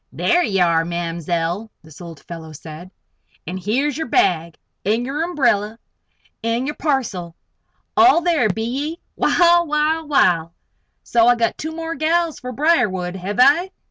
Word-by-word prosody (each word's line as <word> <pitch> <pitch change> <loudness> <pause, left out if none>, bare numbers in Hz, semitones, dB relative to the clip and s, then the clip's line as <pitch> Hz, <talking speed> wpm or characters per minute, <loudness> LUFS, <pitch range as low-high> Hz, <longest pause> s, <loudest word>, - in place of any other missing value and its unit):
"There 350 +1 +1
ye 195 - 0
air, 170 -2 +3
Ma'mzell!" 170 +3 -3
this 160 +1 -15
old 165 -3 -10
fellow 160 -2 -9
said. 160 +4 -10 0.6
"An' 180 - -5
here's 255 - -1
yer 320 - -3
bag 170 -6 +1 0.3
an' 225 +4 0
yer 280 +4 -3
umbrella 240 - 0 0.7
an' 230 +2 -1
yer 295 - -3
parcel. 225 - -2 0.6
All 360 -2 +6
there, 330 -10 +2
be 220 +3 -2
ye? 285 +8 -3 0.2
Wal, 345 -1 +3
wal, 305 +1 0
wal! 170 - +2 0.5
So 235 -1 +3
I 245 - +6
got 230 -1 0
two 315 +1 -6
more 330 0 -4
gals 330 0 0
fer 250 - -6
Briarwood; 220 - +1
hev 190 +2 -5
I?" 295 +9 +5
230 Hz, 150 wpm, -20 LUFS, -, 0.7 s, All